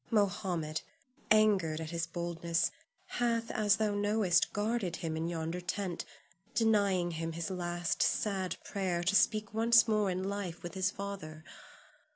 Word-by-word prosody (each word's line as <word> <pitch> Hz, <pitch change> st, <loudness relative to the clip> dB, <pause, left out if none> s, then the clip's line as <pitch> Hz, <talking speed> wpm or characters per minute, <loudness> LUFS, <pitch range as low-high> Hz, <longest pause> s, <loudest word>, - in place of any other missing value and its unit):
Mohammed, 180 Hz, -7 st, 0 dB, 0.5 s
angered 200 Hz, -8 st, +4 dB
at 160 Hz, 0 st, -5 dB
his 165 Hz, -1 st, -2 dB
boldness, 170 Hz, -1 st, -1 dB, 0.3 s
hath, 230 Hz, -1 st, -1 dB
as 205 Hz, -2 st, +3 dB
thou 215 Hz, -2 st, 0 dB
knowest, 205 Hz, -3 st, +2 dB
guarded 205 Hz, -4 st, -1 dB
him 165 Hz, -2 st, -3 dB
in 160 Hz, +1 st, -2 dB
yonder 165 Hz, +1 st, -3 dB
tent, 180 Hz, -1 st, -3 dB, 0.5 s
denying 200 Hz, -6 st, +3 dB
him 165 Hz, 0 st, -3 dB
his 170 Hz, +2 st, -4 dB
last 175 Hz, -2 st, -2 dB
sad 190 Hz, +1 st, 0 dB
prayer 185 Hz, -4 st, -2 dB
to 190 Hz, +3 st, +2 dB
speak 215 Hz, 0 st, +2 dB
once 225 Hz, 0 st, +5 dB
more 215 Hz, -2 st, +2 dB
in 185 Hz, 0 st, -2 dB
life 195 Hz, -3 st, -4 dB
with 175 Hz, -1 st, -6 dB
his 190 Hz, -1 st, +1 dB
father. 185 Hz, -6 st, -7 dB
185 Hz, 145 wpm, -32 LUFS, 170-205 Hz, 0.5 s, once